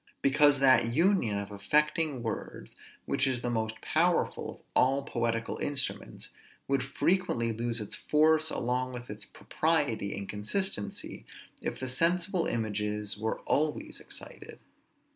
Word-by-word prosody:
Because 145 +1 +5
that 130 -3 +6
union 160 - +2
of 100 0 -5
affecting 150 +6 +1
words, 110 -3 -5 0.3
which 135 - +1
is 130 -2 -1
the 120 - -1
most 110 -1 -2
powerful - - +1
of - - -23
all 135 +2 +3
poetical 115 -3 -2
instruments, 145 -2 -2 0.4
would 140 -1 +1
frequently 140 -4 +1
lose 115 +1 +1
its 105 - -3
force 155 +1 +3
along 125 +1 -1
with 120 -2 -7
its 105 0 -7
propriety 145 -11 -1
and 100 0 -5
consistency, 105 - -2 0.4
if - - -4
the 130 - -3
sensible 170 +6 +1
images 105 -2 -1
were 110 +1 -3
always 150 +1 0
excited. - - -6
125 Hz, 130 wpm, -30 LUFS, 110-150 Hz, 0.4 s, that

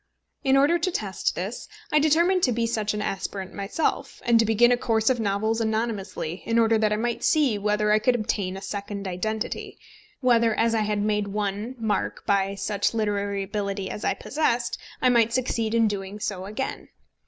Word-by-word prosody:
In 270 -1 +4
order 295 +5 +4
to 335 - +1
test 205 - -2
this, 195 +6 -5 0.2
I 300 - +5
determined 340 +5 +3
to 250 - +1
be 230 0 0
such 215 -2 -1
an 210 - -2
aspirant 190 -1 -4
myself, 200 +10 -2
and 235 -1 +5
to 225 - +4
begin 225 +3 +4
a - - +5
course 225 -1 +1
of 250 - 0
novels 220 +2 0
anonymously, 215 -6 -2
in 230 0 0
order 225 -1 +4
that 215 -1 +2
I - - +2
might 235 +2 -2
see 275 -9 +3
whether 210 +1 +1
I 215 - +5
could 250 +3 +2
obtain 200 -4 -2
a 195 - -9
second 200 0 -5
identity, 215 +4 -3 0.4
whether 235 -4 +3
as 230 0 +2
I 225 - +2
had 210 -1 0
made 210 -1 0
one 205 +4 -3
mark 220 -3 -2
by 195 0 +1
such 205 +2 -1
literary 200 -2 -1
ability 200 -1 -3
as 210 - -6
I - - +1
possessed, 245 -5 -1 0.2
I 255 - +6
might 235 -2 +3
succeed 230 -3 0
in 230 -1 +4
doing 200 0 -4
so 195 -3 -3
again. 215 +7 -5
215 Hz, 190 wpm, -25 LUFS, 200-235 Hz, 0.4 s, I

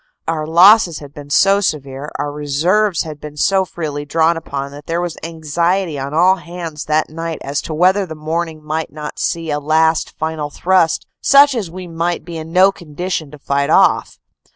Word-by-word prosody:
Our 155 -2 -2
losses 180 +1 +6
had 145 -1 -11
been 145 -1 -11
so 195 +7 +4
severe, 140 -5 -3
our 145 - -3
reserves 165 +7 +1
had 155 -2 -9
been 150 0 -9
so 190 +4 +2
freely 150 -5 -5
drawn 160 +3 +2
upon, 140 -4 -5
that 145 +1 -12
there 165 +1 -1
was 175 -2 -3
anxiety 165 +1 -1
on 135 +1 -4
all 180 +5 +4
hands 170 -4 -7
that 155 0 0
night 165 0 -4
as 140 +1 -2
to 160 - -6
whether 185 +4 +3
the 160 - -7
morning 160 0 -4
might 155 +1 -3
not 150 0 -7
see 165 -3 -2
a 145 - 0
last 160 +2 +1
final 160 -2 -3
thrust 175 +1 +1 0.2
such 280 0 +6
as 220 -8 -3
we 185 +2 -8
might 170 0 -3
be 170 -1 -8
in 160 +1 -8
no 190 +2 +5
condition 175 -2 -5
to 150 - -12
fight 140 0 -1
off. - - +3
160 Hz, 190 wpm, -17 LUFS, 150-175 Hz, 0.2 s, losses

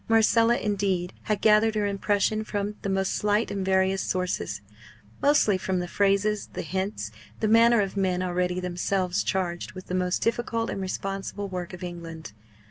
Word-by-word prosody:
Marcella, 225 +1 +4
indeed, 195 -4 -1
had 210 -2 0
gathered 215 0 +4
her 210 -1 +1
impression 205 +2 +1
from 205 -1 -3
the 200 - -3
most 190 0 0
slight 210 +2 +1
and 195 -1 -2
various 190 0 +2
sources 180 - -2 0.6
mostly 250 -9 +4
from 190 0 -1
the 180 0 -2
phrases, 200 +2 +1
the - - -4
hints, 190 +5 -3 0.3
the 215 - +1
manner 230 +1 +6
of 195 -1 -3
men 185 -2 0
already 180 0 0
themselves 180 +1 -1
charged 175 -2 -2
with 185 0 -9
the - - -6
most 180 0 0
difficult 230 0 -1
and 195 - -4
responsible 195 +1 -4
work 180 -2 -5
of 180 -1 -9
England. 165 -5 -7
195 Hz, 165 wpm, -26 LUFS, 180-210 Hz, 0.6 s, manner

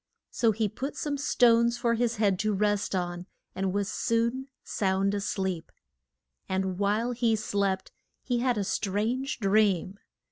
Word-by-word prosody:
So 230 -2 +2
he 220 0 0
put 260 +7 -5
some 295 -1 -2
stones 235 -4 +3
for 240 -1 +1
his 235 0 0
head 200 -4 +1
to 215 -1 +1
rest 205 0 0
on, 175 0 -3 0.3
and 190 0 -1
was 200 0 -1
soon 235 +4 0 0.2
sound 195 0 0
a 205 - -1
sleep. 190 -4 -3 0.8
And 190 -1 -1
while 210 +4 +1
he 235 -2 +2
slept 200 -2 -1 0.3
he 245 -2 0
had 245 -1 +1
a 205 - 0
strange 220 +8 -1
dream. 200 -2 +2
210 Hz, 150 wpm, -28 LUFS, 195-235 Hz, 0.8 s, stones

